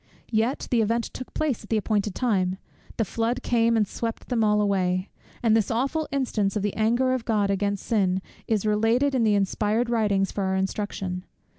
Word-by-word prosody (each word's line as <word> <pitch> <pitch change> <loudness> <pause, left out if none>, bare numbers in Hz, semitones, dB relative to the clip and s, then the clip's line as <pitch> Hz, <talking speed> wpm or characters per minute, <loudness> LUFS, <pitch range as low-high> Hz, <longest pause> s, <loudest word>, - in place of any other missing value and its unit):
Yet 230 +4 0
the 240 -2 +4
event 230 +2 +1
took 255 - -7
place 295 -9 -1
at 210 - -14
the 225 - +2
appointed 210 -1 0
time; 190 -7 +1 0.4
the 225 - +1
flood 230 +5 -1
came 230 -1 +2
and 210 -2 +2
swept 230 +2 -5
them 235 -3 +1
all 210 0 +3
away: 185 -2 0 0.3
and 225 -2 +4
this 220 -3 +2
awful 275 +7 0
instance 230 -8 0
of 210 - -1
the 205 - -1
anger 240 +4 +2
of 255 -3 -1
God 210 -4 +1
against 200 0 -1
sin 190 -5 +1 0.3
is 215 -2 0
related 225 +6 +2
in 255 -3 +2
the 215 -2 +3
inspired 210 +4 0
writings 205 -4 +1
for 200 - -2
our 190 0 0
instruction. 190 -1 -2
215 Hz, 190 wpm, -25 LUFS, 200-235 Hz, 0.4 s, the